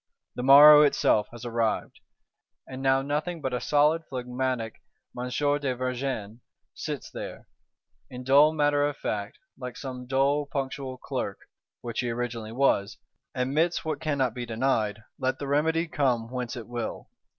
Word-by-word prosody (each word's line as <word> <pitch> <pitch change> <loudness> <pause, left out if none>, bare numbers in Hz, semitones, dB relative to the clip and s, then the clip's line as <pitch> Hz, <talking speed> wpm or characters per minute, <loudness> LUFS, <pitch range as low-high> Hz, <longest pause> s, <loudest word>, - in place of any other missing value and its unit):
The - - -5
morrow 145 +3 +9
itself 110 -7 +3
has 120 0 -10
arrived; 115 -2 -1 0.7
and 130 0 -8
now 135 0 +3
nothing 150 +4 -2
but 130 -4 -3
a 125 - -1
solid 150 +3 +3
phlegmatic 125 -2 -3 0.3
M. 125 +1 -4
de 145 0 0
Vergennes 125 -4 -3 0.3
sits - - -6
there, - - -8 0.6
in 125 0 -8
dull 140 +4 +6
matter 145 -2 +2
of 145 0 -1
fact, 100 0 -4 0.2
like 125 -2 -7
some 125 -2 -7
dull 140 +2 +1
punctual 135 -2 -4
Clerk - - -4 0.4
(which 120 -1 -5
he 125 - -1
originally 115 -2 -4
was); 115 -5 +1 0.4
admits 150 +8 0
what 160 - -3
cannot 140 -6 0
be 125 - -5
denied, 110 -3 -1 0.2
let 130 0 0
the 140 - -5
remedy 160 +4 +1
come 125 -6 0
whence 125 0 -4
it 120 -3 -8
will. 120 -1 -5
130 Hz, 150 wpm, -27 LUFS, 120-145 Hz, 0.7 s, morrow